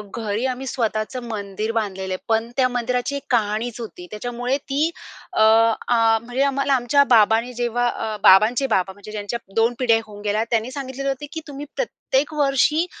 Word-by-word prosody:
घरी 220 +1 -2
आम्ही 265 +2 -7
स्वतःचं 235 +1 -2
मंदिर 210 0 -4
बांधलेलं 190 -4 -2
आहे. 185 - -6
पण 225 +1 +1
त्या 255 -1 +4
मंदिराची 245 +2 -1
एक 280 - -5
कहाणीच 220 +1 0
होती, 180 -5 -9
त्याच्यामुळे 245 +4 -2
ती 285 +3 -1 0.4
अ, - - +1
आ, 225 +1 +4
म्हणजे 245 +3 -1
आम्हाला 275 0 +1
आमच्या 265 +3 +4
बाबांनी 225 +3 +3
जेव्हा 240 0 0
अ, 220 -2 -4
बाबांचे 220 +7 +6
बाबा 190 0 0
म्हणजे 205 +2 -12
ज्यांच्या 210 +2 -4 0.2
2 225 +2 +3
पिढ्या 230 -3 +3
होऊन 205 -1 -11
गेल्या 210 +1 +1
त्यांनी 230 +2 0
सांगितलेलं 275 0 -4
होतं 275 +2 -3
की 325 - -4
तुम्ही 285 0 -7
प्रत्येक 310 - -1
वर्षी 300 +3 +2
235 Hz, 170 wpm, -22 LUFS, 215-265 Hz, 0.4 s, बाबांचे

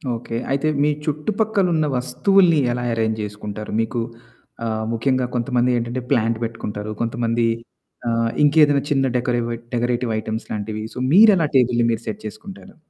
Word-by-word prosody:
Okay. 115 0 -5
అయితే 140 +3 +1 0.2
మీ 150 - +3 0.2
చుట్టుపక్కలున్న 180 +1 0
వస్తువుల్ని, 175 +6 +3
ఎలా 120 0 -2
ఎరేంజ్ 110 -1 0
చేసుకుంటారు? 105 0 -6
మీకు 115 +2 -2 0.7
ఆహ్, 110 -1 -2
ముఖ్యంగా 130 +2 +1
కొంతమంది 125 0 +1
ఏంటంటే, 120 +2 -3
ప్లాంట్ 115 -4 +2
పెట్టుకుంటారు 105 -2 -5
కొంతమంది 115 0 0 0.6
ఆహ్, 115 0 +1
ఇంకేదైనా 145 -1 +5
చిన్న 135 -2 +2
డెకరేవ్ 120 -1 -1 0.3
డెకరేటివ్ 120 0 0
ఐటెమ్స్ 110 +1 -5
లాంటివి 110 0 -4
సో, - - -9 0.2
మీరు 215 +4 +8
ఎలా 165 -3 +2
టేబుల్‌ని 120 -2 +3
మీరు 115 0 -2
సెట్ 110 -1 -4
చేసుకుంటారు? 190 - -10
120 Hz, 140 wpm, -21 LUFS, 115-145 Hz, 0.7 s, మీరు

